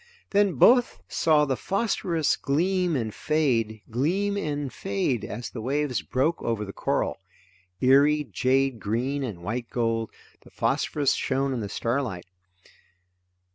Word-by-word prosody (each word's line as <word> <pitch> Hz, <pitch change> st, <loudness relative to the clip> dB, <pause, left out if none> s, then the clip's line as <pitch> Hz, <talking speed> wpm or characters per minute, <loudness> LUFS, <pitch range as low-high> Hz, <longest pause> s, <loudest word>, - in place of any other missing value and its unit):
Then 200 Hz, -2 st, +3 dB
both 245 Hz, -, +4 dB
saw 155 Hz, -2 st, +3 dB
the 135 Hz, -2 st, 0 dB
phosphorus 180 Hz, -, 0 dB
gleam 175 Hz, +4 st, 0 dB
and 110 Hz, -5 st, -2 dB
fade, 120 Hz, -9 st, 0 dB
gleam 185 Hz, -, 0 dB
and 145 Hz, -, -3 dB
fade 100 Hz, +3 st, -1 dB
as 120 Hz, +3 st, -6 dB
the 115 Hz, -, -6 dB
waves 140 Hz, +2 st, -1 dB
broke 150 Hz, +6 st, 0 dB
over 110 Hz, -2 st, -2 dB
the 100 Hz, -, -8 dB
coral. -, -, -1 dB, 0.6 s
Eerie 145 Hz, +3 st, +5 dB
jade 130 Hz, -2 st, +1 dB
green 125 Hz, +8 st, -1 dB
and 100 Hz, -9 st, -6 dB
white 115 Hz, +5 st, -3 dB
gold, 115 Hz, -2 st, -1 dB, 0.3 s
the -, -, -17 dB
phosphorus 145 Hz, -3 st, 0 dB
shone 135 Hz, 0 st, 0 dB
in 125 Hz, -, -2 dB
the 105 Hz, -3 st, -4 dB
starlight. 115 Hz, -6 st, -2 dB
135 Hz, 135 wpm, -26 LUFS, 115-150 Hz, 0.6 s, Eerie